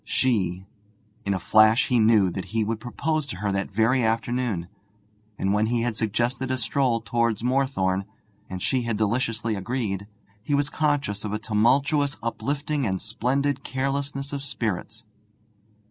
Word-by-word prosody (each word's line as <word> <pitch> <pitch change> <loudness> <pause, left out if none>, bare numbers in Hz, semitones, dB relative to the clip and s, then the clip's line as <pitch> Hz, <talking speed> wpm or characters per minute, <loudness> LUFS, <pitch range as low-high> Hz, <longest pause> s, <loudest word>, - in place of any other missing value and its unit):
She.... 95 -8 0 0.6
In 100 - +2
a - - -2
flash 110 +4 +5
he 125 - +3
knew 110 -4 +5
that 95 0 -4
he 110 0 -1
would 110 +1 -2
propose 155 +5 -2
to - - -5
her 100 +1 -1
that 100 0 -1
very 110 +6 +2
afternoon. 115 -4 0 0.7
And 95 +1 +1
when 105 +1 +2
he 115 0 +1
had 120 -2 -1
suggested 120 +4 -1
a 130 - 0
stroll 125 -2 +1
towards 115 +1 0
Moorthorne, 120 -8 +1 0.4
and 95 -1 -5
she 130 -2 +1
had 115 -3 -2
deliciously 115 +1 0
agreed, 100 -1 -3 0.3
he 140 +6 0
was 145 +1 0
conscious 145 -10 0
of 105 -1 -3
a - - +1
tumultuous 135 +7 +2
uplifting 145 +4 -2
and 95 -5 0
splendid 135 +6 -1
carelessness 140 +1 -2
of 140 - -3
spirits. 110 -4 -4
115 Hz, 155 wpm, -25 LUFS, 105-135 Hz, 0.7 s, flash